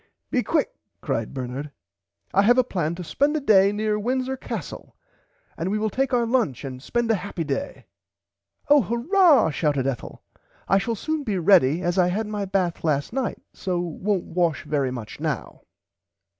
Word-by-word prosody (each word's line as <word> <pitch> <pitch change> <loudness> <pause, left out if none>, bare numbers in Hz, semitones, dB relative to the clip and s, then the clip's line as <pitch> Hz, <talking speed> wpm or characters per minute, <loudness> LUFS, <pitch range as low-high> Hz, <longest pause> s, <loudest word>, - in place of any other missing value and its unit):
Be - - +2
quick - - 0 0.3
cried 115 -1 -2
Bernard 130 +2 -5 0.6
I 195 - +5
have 240 +5 +4
a 255 - +5
plan 170 -8 -2
to 180 - -6
[Pg - - -12
89] - - -8
spend 290 +3 +2
a - - 0
day 200 -7 +5
near 210 0 -1
Windsor 255 +4 -1
Castle 265 - -7 0.6
and 165 +3 -3
we 210 - 0
will 215 0 -1
take 270 +5 0
our 240 -2 +2
lunch 225 - 0
and 130 -1 -7
spend 235 - 0
a 210 - 0
happy 185 -4 -4
day. 160 - -4 0.8
Oh 290 0 +6
Hurrah 255 - +4
shouted 145 -4 0
Ethel 135 -2 -4 0.4
I 195 - +4
shall 230 +3 -2
soon 310 +8 -2
be 215 -8 -2
ready 175 -3 +4
as 175 +1 0
I 180 - +4
had 205 +5 -1
my 210 -1 -3
bath 185 -3 -1
last 150 +3 0
night 265 -2 -2
so 180 -3 -2
wont 180 +3 -1
wash 170 -4 0
very 145 -3 0
much 120 -4 -7
now. - - -4
195 Hz, 185 wpm, -24 LUFS, 160-235 Hz, 0.8 s, Oh